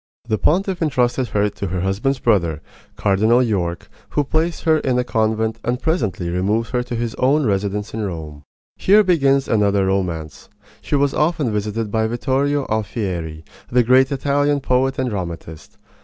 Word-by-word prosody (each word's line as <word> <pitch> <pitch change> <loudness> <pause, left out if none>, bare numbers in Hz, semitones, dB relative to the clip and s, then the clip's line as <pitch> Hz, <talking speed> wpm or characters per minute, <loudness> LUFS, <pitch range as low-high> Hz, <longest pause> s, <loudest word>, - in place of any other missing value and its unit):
The 110 -2 0
pontiff 185 +2 +1
intrusted 130 -4 +1
her 105 0 +1
to 100 -1 -5
her 90 0 -2
husband's 100 +9 0
brother, 85 - +1 0.3
Cardinal 110 +5 +3
York, 90 -7 -2 0.2
who 145 - 0
placed 160 +4 -1
her 160 -1 +3
in 130 -2 0
a 125 - +2
convent 110 -1 0
and 120 +1 -1
presently 110 - -1
removed 105 +6 0
her 125 -1 +1
to 120 0 -5
his 115 -1 -2
own 140 +3 +3
residence 100 0 -1
in 110 - -3
Rome. 80 -6 -6 0.3
Here 210 +3 +5
begins 140 -7 +2
another 100 -3 +2
romance. 85 -6 -3 0.3
She - - -2
was 140 -1 +2
often 150 -5 +1
visited 105 +1 -2
by 110 0 +1
Vittorio 135 +4 0
Alfieri, 95 -8 -3 0.3
the 125 0 +4
great 130 +3 +4
Italian 145 +1 +1
poet 130 0 +1
and 130 -2 -1
dramatist. 85 -5 -7
115 Hz, 160 wpm, -20 LUFS, 100-135 Hz, 0.3 s, Here